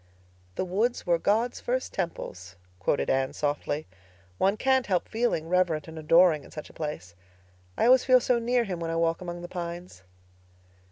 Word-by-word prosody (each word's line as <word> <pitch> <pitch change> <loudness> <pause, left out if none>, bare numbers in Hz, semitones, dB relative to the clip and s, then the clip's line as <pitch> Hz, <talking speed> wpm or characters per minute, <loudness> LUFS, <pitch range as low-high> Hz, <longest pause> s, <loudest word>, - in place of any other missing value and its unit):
"'The - - -1
woods 215 +7 0
were 170 -2 +2
God's 225 +7 +1
first 255 +1 -2
temples,'" 95 - -5 0.2
quoted 100 +9 0
Anne 135 0 +1
softly. 145 0 -2 0.5
"One 195 +2 +2
can't 265 +1 +2
help 185 -3 0
feeling 225 -8 -1
reverent 170 -4 +1
and 160 0 -8
adoring 165 -1 +4
in - - -14
such 155 - -9
a - - -24
place. 150 - -6 0.6
I - - +2
always 255 +1 +6
feel 255 -1 +6
so 245 0 +1
near 240 +1 +1
Him 185 -6 -4
when 165 -1 -3
I 165 - -2
walk 165 +1 +1
among 175 -1 -6
the - - -5
pines." 175 - -7
175 Hz, 175 wpm, -27 LUFS, 155-225 Hz, 0.6 s, always